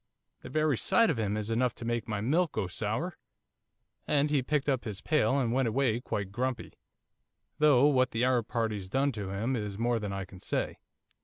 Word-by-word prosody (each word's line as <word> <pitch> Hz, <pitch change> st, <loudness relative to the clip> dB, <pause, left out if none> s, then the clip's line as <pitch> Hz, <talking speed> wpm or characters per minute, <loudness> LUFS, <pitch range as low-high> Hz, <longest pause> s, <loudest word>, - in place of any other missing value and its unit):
"The -, -, -9 dB
very 155 Hz, -2 st, +1 dB
sight 230 Hz, -4 st, +4 dB
of 130 Hz, -, -3 dB
him 105 Hz, -1 st, 0 dB
is 105 Hz, +1 st, -3 dB
enough 120 Hz, +1 st, +1 dB
to 115 Hz, -, -8 dB
make 120 Hz, -1 st, -2 dB
my 105 Hz, -2 st, -2 dB
milk 155 Hz, -, +1 dB
go -, -, -1 dB
sour." 110 Hz, -, -3 dB, 0.9 s
And 150 Hz, 0 st, +2 dB
he 145 Hz, -3 st, +3 dB
picked 145 Hz, +2 st, -1 dB
up 135 Hz, -3 st, +1 dB
his 105 Hz, -4 st, -5 dB
pail 150 Hz, -3 st, +2 dB
and 120 Hz, -3 st, 0 dB
went 130 Hz, -1 st, +2 dB
away 120 Hz, -1 st, +1 dB
quite 100 Hz, -5 st, -3 dB
grumpy, 125 Hz, +3 st, -3 dB, 0.9 s
though 145 Hz, -3 st, +6 dB
what 130 Hz, -3 st, +4 dB
that 115 Hz, +1 st, -1 dB
Arab 125 Hz, -3 st, +2 dB
party's 110 Hz, -5 st, -2 dB
done 135 Hz, +6 st, +1 dB
to 105 Hz, -5 st, -5 dB
him 110 Hz, +7 st, -1 dB
is 105 Hz, -4 st, -4 dB
more 120 Hz, +1 st, +1 dB
than 105 Hz, -2 st, -4 dB
I 100 Hz, -1 st, -4 dB
can 95 Hz, -1 st, -13 dB
say. -, -, -2 dB
120 Hz, 205 wpm, -30 LUFS, 105-135 Hz, 0.9 s, though